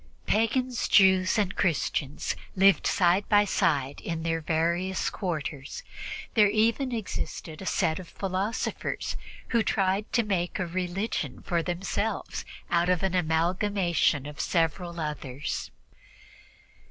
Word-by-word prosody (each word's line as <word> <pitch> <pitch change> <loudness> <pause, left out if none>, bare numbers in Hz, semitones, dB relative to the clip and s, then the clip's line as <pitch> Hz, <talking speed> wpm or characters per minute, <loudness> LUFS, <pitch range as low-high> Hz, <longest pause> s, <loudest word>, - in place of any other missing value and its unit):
Pagans, 235 +3 +1
Jews 190 +1 +5
and 200 -3 +1
Christians 150 -4 0 0.2
lived 195 0 +5
side 180 +2 +3
by 205 -1 +5
side 145 -8 +1
in 165 -1 -3
their 165 0 0
various 170 +4 0
quarters; 155 -7 -4 0.5
there 210 -3 +6
even 230 +5 +2
existed 190 -7 -4
a 190 - -6
set 165 -2 +1
of 185 - -9
philosophers 195 +3 -2 0.3
who 235 -2 +3
tried 195 -1 0
to 235 - +3
make 185 -4 -1
a 185 - -1
religion 180 - -3
for 170 -1 0
themselves 195 +4 -2 0.3
out 175 +1 +3
of 180 -1 +2
an 190 -1 +1
amalgamation 175 -2 +1
of 150 0 -8
several 170 +1 0
others. 145 -3 -4
180 Hz, 120 wpm, -28 LUFS, 165-200 Hz, 0.5 s, there